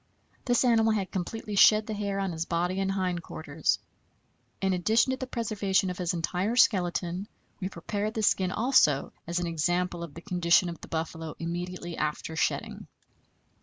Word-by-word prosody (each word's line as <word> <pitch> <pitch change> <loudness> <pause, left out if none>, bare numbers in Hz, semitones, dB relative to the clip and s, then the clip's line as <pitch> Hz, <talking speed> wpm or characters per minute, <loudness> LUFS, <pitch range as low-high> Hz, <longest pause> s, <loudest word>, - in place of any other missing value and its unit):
This 245 0 +3
animal 225 -2 +4
had 195 -3 -2
completely 205 +3 -4
shed 215 +2 +6
the 220 - -4
hair 200 -1 -2
on 195 -2 -1
his 165 0 -3
body 175 +2 -1
and 195 0 0
hind 185 -3 -1
quarters. 155 -2 -1 0.8
In 190 -1 +1
addition 220 +7 +3
to 260 - -1
the 260 - -5
preservation 205 -6 0
of 180 - -8
his 175 -1 -1
entire 180 +6 -1
skeleton, 180 -3 +2 0.3
we 190 -1 -3
prepared 205 +5 -3
the 220 - -1
skin 185 -2 +2
also, 220 - +3
as 170 +1 -2
an 175 - 0
example 175 +2 0
of 170 -4 -7
the 170 - -8
condition 175 -1 +3
of 170 - -8
the - - -9
buffalo 160 -1 -4
immediately 175 0 -5
after 155 +1 -2
shedding. - - -2
180 Hz, 170 wpm, -28 LUFS, 170-210 Hz, 0.8 s, shed